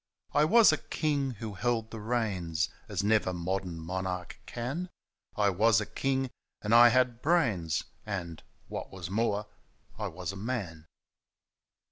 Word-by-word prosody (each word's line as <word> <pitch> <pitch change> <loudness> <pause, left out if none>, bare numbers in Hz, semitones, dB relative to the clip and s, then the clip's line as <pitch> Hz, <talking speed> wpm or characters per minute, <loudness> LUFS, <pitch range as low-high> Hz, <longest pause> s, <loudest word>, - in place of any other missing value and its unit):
I 150 +1 +5
was 220 +3 +7
a 155 - +1
king 145 -3 -1
who 110 -3 -6
held 115 +2 -1
the 115 - -6
reins 95 -8 0 0.2
As 100 -2 -1
never 105 -2 +3
modem 90 0 -2
monarchs 90 +2 -4
can; 140 +10 -4 0.5
I 100 -1 +3
was 105 +3 +4
a 105 - -2
king, 135 +2 -1 0.3
and 105 +2 +1
I 120 +1 +9
had 125 -1 +2
brains, 115 - +2 0.2
Andy 90 -6 -5 0.3
what - - -5
was 95 -1 -7
more, 105 -1 +1 0.5
I - - -1
was 90 +1 -5
a - - -9
man 95 -7 -4
105 Hz, 145 wpm, -30 LUFS, 90-120 Hz, 0.5 s, I